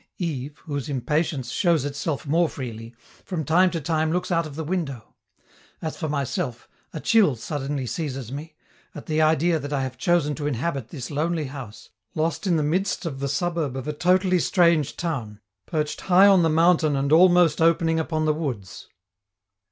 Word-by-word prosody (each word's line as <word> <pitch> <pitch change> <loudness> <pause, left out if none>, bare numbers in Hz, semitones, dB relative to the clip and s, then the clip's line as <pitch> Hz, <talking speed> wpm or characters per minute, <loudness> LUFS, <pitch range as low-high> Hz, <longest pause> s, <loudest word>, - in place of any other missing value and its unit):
Yves, 145 -5 -4
whose 145 -1 -4
impatience 140 0 -1
shows 165 -4 +2
itself 145 +1 -3
more 165 +3 +2
freely, 115 -3 -7 0.3
from 165 -6 -4
time 180 +6 +4
to 170 - -3
time 155 +1 0
looks 180 +2 -1
out 165 -2 +1
of 145 - -10
the 160 - -4
window. 150 -8 -4 0.7
As 160 - -4
for 155 - -4
myself, 135 -4 -3 0.2
a 155 - -6
chill 200 - +3
suddenly 135 +3 -4
seizes 135 -3 -4
me, 150 +3 -7 0.4
at - - -8
the 155 0 0
idea 160 +2 +3
that 145 0 -6
I 140 -2 0
have 130 -1 -6
chosen 170 -2 +2
to 145 -1 -2
inhabit 135 -2 -2
this 130 -4 -7
lonely 155 +2 -1
house, 130 -6 -9 0.2
lost 160 +3 -1
in 175 - +3
the 155 - +1
midst 185 +6 -1
of 140 -5 -4
the 140 - -2
suburb 160 -2 -1
of 130 - -6
a 150 - -2
totally 185 +3 +2
strange 170 -6 +2
town, 120 -12 -4 0.3
perched 150 -2 -2
high 190 +1 +5
on 195 -3 +6
the 165 - +3
mountain 160 -2 +3
and 140 +1 -1
almost 175 -1 +5
opening 165 0 +3
upon 155 -1 -1
the 155 - +3
woods. 130 - -5
155 Hz, 180 wpm, -24 LUFS, 140-170 Hz, 0.7 s, on